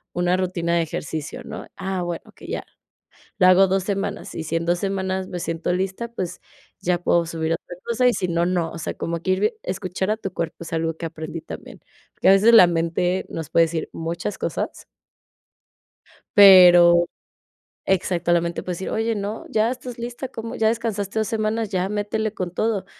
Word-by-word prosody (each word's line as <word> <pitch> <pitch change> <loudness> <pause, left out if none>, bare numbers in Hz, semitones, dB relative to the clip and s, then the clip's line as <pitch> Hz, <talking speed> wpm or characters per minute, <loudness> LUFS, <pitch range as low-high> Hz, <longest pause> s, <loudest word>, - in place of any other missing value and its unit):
una 175 +1 +2
rutina 175 -2 -1
de 170 - +2
ejercicio, 155 -1 -5
¿no? - - -8
Ah, 190 -2 -3
bueno, 175 -1 -4
okey, - - -14
ya. - - -3 0.7
Lo 185 -3 +5
hago 185 +1 +6
2, 190 0 +1
semanas, 200 +1 -3
y 160 - -4
si 160 +1 -3
en 165 0 0
2, 175 +1 +1
semanas 190 -1 -2
me 180 - -5
siento 165 +1 -2
lista, 190 +5 -2
pues, 185 -6 -5 0.4
ya 175 0 0
puedo 170 -1 +2
subir 165 -1 -3
otra 175 +1 -6
cosa, 240 +2 +2
y 245 - +4
si 185 - -1
no 170 0 +1
no, 175 -2 0
o - - -7
sea, - - -3
como 170 0 -3
que 185 - 0
ir 185 - +1
vi 210 - +3
escuchar 190 +1 -3
a - - +2
tu 195 -3 -5
cuerpo, 165 -2 -3
es 170 - -8
algo 165 0 -1
que 165 - -6
aprendí 160 0 -7
también. - - -10 0.3
Porque, - - +2
a - - +9
veces 205 +4 +6
la 220 -5 +10
mente 170 +2 0
nos 160 -2 -6
puede 165 0 +5
decir 160 0 -4
muchas 170 +5 -4
cosas - - -4 1.5
pero, 175 -3 +8 0.8
exacto, 175 -2 +1
la 170 0 +4
mente 170 0 -3
puede 180 - -3
decir, 185 - -5
oye, 225 +1 0
no, 205 +2 -4
ya 220 +1 +2
estás 250 -1 -7
lista, 240 +2 -5
¿cómo? 230 -1 -6
Ya 220 - +2
descansaste 220 -2 -2
2, 220 - 0
semanas. 220 0 -1
Ya 185 -1 0
métele 210 +1 -2
con 180 -4 -4
todo. 215 0 -1
185 Hz, 200 wpm, -23 LUFS, 170-205 Hz, 1.5 s, la